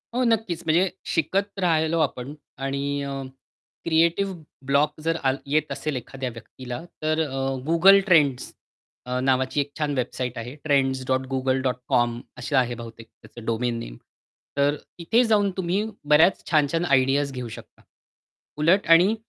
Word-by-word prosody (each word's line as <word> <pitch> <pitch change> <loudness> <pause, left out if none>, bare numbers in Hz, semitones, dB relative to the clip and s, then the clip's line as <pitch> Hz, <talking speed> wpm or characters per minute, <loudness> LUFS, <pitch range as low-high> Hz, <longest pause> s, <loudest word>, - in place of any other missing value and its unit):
हो. 255 - +2
नक्कीच, 220 -7 0
म्हणजे 175 +4 +3 0.2
शिकत 195 +4 -1
राहिलो 165 -2 +2
आपण 135 -3 -2 0.3
आणि 140 +1 -2
अ, 140 -1 -4 0.6
क्रिएटिव्ह 170 +4 +2 0.3
ब्लॉक 145 +3 +1
जर 165 +1 0
आल 135 0 +2
येत 150 +2 0
असेल 155 -3 -3
एखाद्या 130 +1 -5
व्यक्तीला, 125 +3 -8 0.2
तर 155 +1 +1
अ, 135 - -6 0.3
Google 190 +4 +7
Trends 145 -7 +3 0.5
अ, 125 0 -2
नावाची 130 +2 +1
एक 145 0 -6
छान 150 -1 0
वेबसाईट 125 0 -3
आहे 120 +4 -6
trends.google.com 130 -2 0 0.2
अशी 125 +4 -3
आहे 125 -2 +2
बहुतेक 115 -1 -10
त्याचं 115 0 -14
डोमेन 115 +1 -1
नेम. - - -8 0.6
तर 145 +1 +3 0.2
इथे 225 +9 +3
जाऊन 210 -3 +3
तुम्ही 185 +3 0 0.3
बऱ्याच 160 +5 +5
छान-छान 160 +2 +2
आयडियाज 135 0 +2
घेऊ 125 -2 -5
शकता. 110 - -12 0.8
उलट 170 +6 +3
आणि 180 +6 +6
140 Hz, 135 wpm, -24 LUFS, 130-165 Hz, 0.8 s, Google